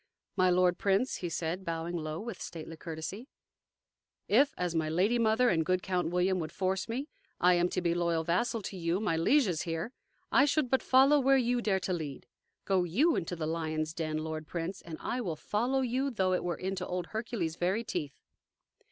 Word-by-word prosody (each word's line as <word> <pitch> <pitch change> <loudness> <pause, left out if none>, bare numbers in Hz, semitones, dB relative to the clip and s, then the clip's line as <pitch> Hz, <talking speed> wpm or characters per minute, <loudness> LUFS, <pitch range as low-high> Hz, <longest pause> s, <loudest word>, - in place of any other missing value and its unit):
"My 185 0 +4
lord 180 0 +3
prince," 200 +6 +1
he 175 - -4
said, 165 +3 -3
bowing 165 0 -3
low 155 -1 -3
with 220 -2 -6
stately 165 -1 -7
courtesy, 165 +9 -6 1.0
"if, 275 +7 +4
as 180 -2 -1
my 160 -2 0
lady 195 +9 +2
mother 230 +2 +3
and 165 -5 +2
good 185 +3 0
Count 180 -3 0
William 180 +2 +1
would 160 -2 -4
force 190 +2 -1
me, 260 +6 -3 0.3
I 180 +1 +5
am 175 0 +2
to 185 - -2
be 170 -1 +2
loyal 170 -1 0
vassal 215 +7 0
to 195 - -5
you, 170 +1 0
my 205 -6 0
lieges 180 - +3
here, 165 +6 -3 0.4
I 275 - +6
should 285 -3 +1
but 265 - +3
follow 270 +3 +5
where 270 0 +4
you 245 -1 +1
dare 195 -4 +1
to 185 - -1
lead. 150 -6 -5 0.4
Go 190 -2 +2
YOU 265 - +2
into 175 +1 -2
the 160 -2 -3
lions' 155 -1 -2
den, 155 -2 -2
lord 155 -1 -5
prince, 175 +2 -4
and 165 -2 -8
I 250 - -2
will 175 -8 -2
follow 240 - 0
you, 260 +2 0
though 190 -7 +1
it 180 - 0
were 175 -1 -2
into 190 0 -3
old 180 -1 -2
Hercules' 220 -8 -2
very 190 +6 0
teeth." 150 -10 -4
180 Hz, 200 wpm, -31 LUFS, 165-230 Hz, 1.0 s, I